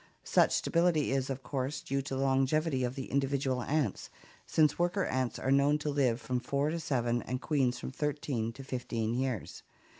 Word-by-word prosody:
Such - - +4
stability 170 -4 +2
is, 135 0 0
of 135 0 -4
course, 135 +2 -2
due 135 +1 -1
to 135 0 -4
the 135 - -1
longevity 135 +1 +2
of 125 +1 -2
the 135 - -6
individual 135 -2 0
ants, 140 -5 -1 0.4
since 155 -1 +3
worker 175 +3 +1
ants 130 -2 -1
are 130 - -1
known 140 +2 +4
to 150 0 -2
live 130 -5 +2
from 130 -3 -2
four 140 +4 0
to 165 - -2
seven 120 -6 0
and 130 0 -3
queens 130 -5 +1
from 125 - -6
thirteen 135 -5 -2
to 135 - -9
fifteen 115 -4 -2
years. 125 -4 -3
135 Hz, 185 wpm, -31 LUFS, 125-145 Hz, 0.4 s, Such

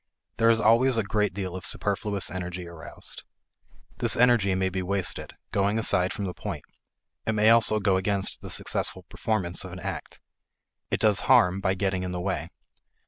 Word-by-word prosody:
There 115 0 +4
is 115 -1 +4
always 115 +3 +4
a 115 - +2
great 105 +1 0
deal 95 -1 -5
of 95 - -7
superfluous 100 0 -1
energy 90 -1 -5
aroused. 85 -2 -8 0.8
This - - +2
energy 115 -6 +4
may 95 0 0
be 95 0 -3
wasted, 95 0 -2 0.2
going 100 +2 +1
aside 95 -4 +3
from 100 - -4
the 90 - -4
point; - - -6 0.6
it 110 - +1
may 110 +1 +4
also 115 -2 +5
go 95 -2 +2
against 100 +1 +1
the - - -8
successful - - -1
performance 95 -6 -2
of 90 -2 -9
an 90 - -8
act. 95 -1 -6 0.7
It - - -1
does 105 -2 +4
harm 105 -8 +5
by 95 -1 +1
getting 95 -1 -1
in 90 0 -4
the 90 - -3
way. 90 -3 -3
100 Hz, 180 wpm, -26 LUFS, 90-110 Hz, 0.8 s, also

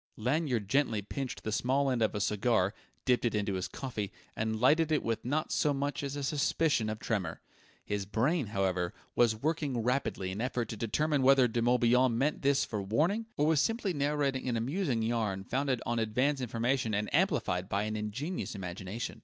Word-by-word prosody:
Lanyard 125 -2 0
gently 115 -4 +1
pinched 135 +5 -5
the 110 - -2
small 135 +5 +1
end 125 -2 0
of 110 - +1
a - - -1
cigar, 105 -1 +1 0.3
dipped 125 -2 +3
it 120 -2 +1
into 100 -1 0
his 95 -1 -2
coffee, 110 -7 -5 0.2
and 110 0 -1
lighted 155 +6 +4
it 155 - +2
with 115 -1 -2
not 145 +5 -1
so 145 -2 +2
much 140 +1 -2
as 140 -1 -4
a 145 - -4
suspicion 140 -4 +1
of 110 - -3
tremor. 110 -5 -2 0.5
His 100 -2 -2
brain, 125 - +1
however, 95 -3 -1 0.2
was 115 -2 +4
working 140 -2 -1
rapidly 125 -7 -1
in 100 +4 -4
effort 125 -2 -2
to - - -4
determine 140 +7 0
whether 130 -1 +6
De 120 0 -1
Morbihan 120 0 +3
meant 145 +5 0
this 140 0 +3
for 105 -2 -3
warning, 165 - 0
or 145 - +3
was 155 -2 +4
simply 225 -3 0
narrating 140 -3 0
an 120 - 0
amusing 130 - -1
yarn 110 -4 -1
founded 130 +2 -1
on 120 0 0
advance 130 +6 +1
information 120 -1 0
and 105 +1 0
amplified 125 - +1
by 100 +1 0
an 110 0 -2
ingenious 110 - -4
imagination. 95 +4 -5
120 Hz, 185 wpm, -31 LUFS, 110-140 Hz, 0.5 s, whether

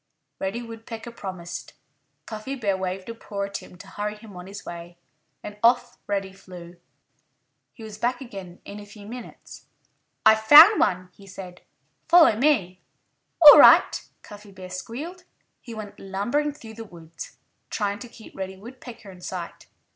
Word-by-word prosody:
Reddy 210 +5 -3
Woodpecker 230 0 -9
promised. 185 -6 -8 0.5
Cuffy 220 +5 -6
Bear 205 -7 -1
waved 185 0 -5
a - - -4
paw 205 -3 -6
at 200 0 -4
him 180 - -14
to - - -13
hurry 210 +1 -5
him 210 -2 -14
on 180 +1 -10
his 200 +1 -10
way. 175 0 -9 0.5
And 210 0 -9
off 240 +1 +2
Reddy 195 -2 -3
flew. 180 -2 -13 0.9
He 225 - -14
was 215 -1 -10
back 245 +1 -1
again 195 -9 -10
in 205 - -9
a 205 - -11
few 205 0 -13
minutes. 240 +2 -11 0.6
"I've 220 0 +6
found 310 - +9
one," 185 0 0
he 200 - -17
said. 185 -2 -10 0.5
"Follow 335 -9 +7
me!" 210 -9 +1 0.6
"All 295 - +12
right!" - - +6 0.2
Cuffy 205 -1 -13
Bear 185 -1 -11
squealed. 305 - -7 0.4
He 230 -2 -10
went 210 -2 -9
lumbering 205 +10 -2
through 225 -6 -12
the 225 +1 -8
woods, 165 -5 -12 0.3
trying 205 -1 -2
to 245 - -10
keep 230 -1 -15
Reddy 190 0 -6
Woodpecker 230 -1 -12
in 180 -1 -15
sight. 175 -1 -7
205 Hz, 160 wpm, -24 LUFS, 190-235 Hz, 0.9 s, All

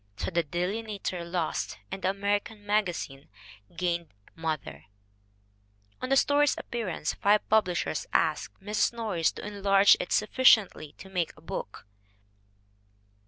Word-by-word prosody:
So - - -3
the 170 0 +2
Delineator 185 +3 -3
lost 170 -1 -2
and 190 0 -5
the 185 - +1
American 205 +2 -2
Magazine 180 -10 -1 0.5
gained 170 -2 -1 0.2
Mother. 155 - -4 1.2
On 255 - -3
the 270 - +4
story's 290 +1 +3
appearance 210 -10 -3
five 205 +1 +2
publishers 200 -5 +1
asked - - 0
Mrs. 210 +3 +1
Norris 210 -9 0
to - - -8
enlarge 200 -1 +5
it - - -4
sufficiently 215 - +3
to 190 - -13
make 180 -4 -2
a - - -16
book. 110 -10 -6
195 Hz, 120 wpm, -28 LUFS, 170-210 Hz, 1.2 s, enlarge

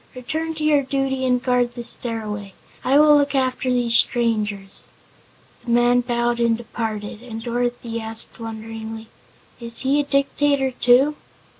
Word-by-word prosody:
"Return 315 +6 -4
to 310 - -5
your 300 -2 +4
duty 265 -1 -1
and 250 -1 +1
guard 245 -1 +1
the 240 - -6
Stairway. 210 -4 -3 0.3
I 270 +2 +3
will 300 0 +7
look 285 -1 +2
after 260 -1 0
these 240 -2 +2
strangers." 210 -6 +1 0.7
The 240 - -9
man 240 +1 +4
bowed 240 0 -1
and 230 -1 +2
departed, 220 -2 -5
and 225 -2 -8
Dorothy 240 -1 -2
asked 220 +1 -5
wonderingly: 225 0 -6 0.5
"Is 235 -1 -3
he 275 +2 +2
a - - +2
Dictator, 275 -1 +1
too?" 255 +4 +3
240 Hz, 145 wpm, -21 LUFS, 225-265 Hz, 0.7 s, will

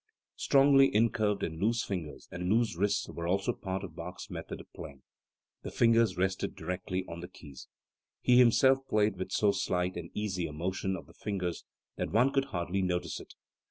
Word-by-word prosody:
Strongly 135 0 +5
incurved 105 -2 +2
and 80 0 -4
loose 115 +3 +2
fingers 80 -8 -5
and 90 0 -3
loose 115 -4 +2
wrists 100 +3 0
were 85 0 -5
also 100 +6 +1
part 95 -2 -4
of 85 -5 -8
Bach's 90 +2 -8
method - - -6
of - - -14
playing. 70 -2 -10 0.6
The - - -6
fingers 115 -5 +3
rested 95 +1 -1
directly 90 +2 -3
on 85 0 -7
the 90 - -7
keys. 70 -7 -12 0.5
He 125 0 +5
himself 130 +2 +5
played 105 -2 +2
with 95 - -5
so 105 -1 +3
slight 90 -2 -1
and 85 -1 -6
easy 95 -5 -2
a 75 - -8
motion 95 +4 -2
of - - -8
the - - -18
fingers 90 -4 -4 0.3
that - - -2
one 125 +6 +3
could 135 -1 +2
hardly 90 -3 -2
notice 90 -1 -1
it. - - -13
95 Hz, 185 wpm, -31 LUFS, 90-110 Hz, 0.6 s, Strongly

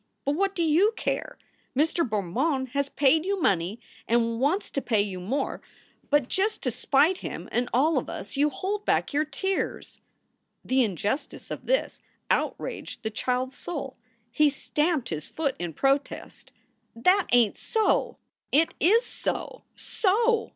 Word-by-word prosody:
But 280 - +2
what 390 +6 0
do 340 - +1
you 345 +8 +4
care? - - -3 0.4
Mr. 320 +4 +2
Bermond 255 - -1
has 280 +2 -1
paid 290 +3 +3
you 395 +1 -1
money 195 - +1 0.3
and 230 0 +1
wants 305 +10 0
to 275 - -1
pay 220 -6 +2
you 190 -3 -5
more, 260 +10 -2 0.5
but 290 -3 +3
just 420 +7 -1
to - - 0
spite 310 +7 +2
him - - -6
and 240 0 0
all 280 +4 +3
of - - -7
us 195 - -7
you 290 +2 +3
hold 400 +6 -3
back - - +1
your 300 +2 +2
tears." 380 +6 -3 0.6
The 260 0 +3
injustice 210 - -3
of - - -6
this - - 0 0.3
outraged 235 - -2
the 220 - -2
child 250 +3 -1
s 270 - -17
soul. 275 -6 -5 0.4
He 300 +4 +4
stamped 295 -1 -1
his 155 -2 -4
foot 285 -4 -2
in 175 -1 -3
protest. 275 - -1 0.4
"That 365 +11 +3
ain 235 -4 +5
t - - -20
so!" 440 -2 +1 0.3
"It 315 +4 +4
is 445 +8 +4
so, - - -4
so!" 455 +3 +1
280 Hz, 160 wpm, -26 LUFS, 240-350 Hz, 0.6 s, ain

